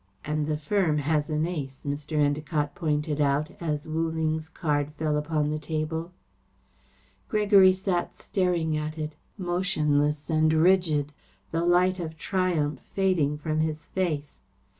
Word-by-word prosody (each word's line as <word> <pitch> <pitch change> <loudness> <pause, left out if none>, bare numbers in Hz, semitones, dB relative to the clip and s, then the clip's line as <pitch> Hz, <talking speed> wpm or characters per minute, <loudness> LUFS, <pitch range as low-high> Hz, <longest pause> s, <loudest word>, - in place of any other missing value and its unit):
"And 150 0 -1
the 155 -1 0
firm 160 0 +1
has 150 +1 0
an 155 0 +1
ace," 145 -7 -5
Mr. 145 +2 -3
Endacott 145 0 0
pointed 150 -2 -1
out, 145 +2 +1
as 150 -2 -2
Wu 160 +1 0
Ling's 160 -1 -1
card 150 -4 -1
fell 155 0 -1
upon 150 0 0
the 155 - -2
table. 160 +2 -3 1.2
Gregory 205 -3 +6
sat 185 -2 -1
staring 175 -5 0
at 155 +1 -3
it, 155 0 -4 0.2
motionless 155 -6 0
and 155 -1 +3
rigid, 160 -3 +3 0.4
the 165 +1 0
light 180 +2 +3
of 160 -2 -5
triumph 160 -6 0 0.2
fading 175 -7 +2
from 155 +1 -2
his 155 0 -2
face. 155 -6 -2
155 Hz, 140 wpm, -27 LUFS, 150-175 Hz, 1.2 s, Gregory